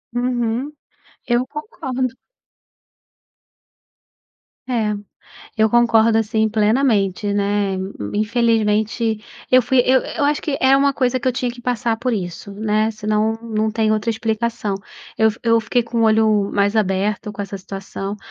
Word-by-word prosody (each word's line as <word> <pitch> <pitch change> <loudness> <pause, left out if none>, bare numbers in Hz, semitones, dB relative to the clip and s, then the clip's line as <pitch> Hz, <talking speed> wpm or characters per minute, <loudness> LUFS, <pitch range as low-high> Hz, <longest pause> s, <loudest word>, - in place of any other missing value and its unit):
Uhum, 245 +2 -1 0.6
eu 240 +1 +1
concordo. 270 - -4 2.6
É, 225 -4 0 0.6
eu 220 -1 +3
concordo 230 -2 +4
assim 220 0 +1
plenamente, 210 -3 +1
né, 200 -1 0 0.3
infelizmente 220 0 +1 0.3
eu 255 0 +6
fui 260 +2 +1
eu 260 0 +4
eu 295 - -4
acho 295 0 +1
que 295 - -2
é 265 +1 +5
uma 280 0 +3
coisa 255 -1 0
que 255 - -7
eu 255 - +3
tinha 245 0 -2
que 240 0 -12
passar 240 -2 0
por 245 +1 -2
isso, 190 0 -5
né, 215 +1 0
senão 215 +1 -1
não 220 -1 -1
tem 220 -1 +1
outra 215 +2 0
explicação. 225 -1 -2 0.4
Eu 220 0 +4
fi 220 - -11
eu 230 -1 +4
fiquei 240 +2 +1
com 230 0 -3
o - - +3
olho 215 -2 +3
mais 200 +2 +1
aberto 205 +1 0
com 205 - -8
essa 200 0 -5
situação, 195 +1 -6
225 Hz, 145 wpm, -20 LUFS, 210-245 Hz, 2.6 s, eu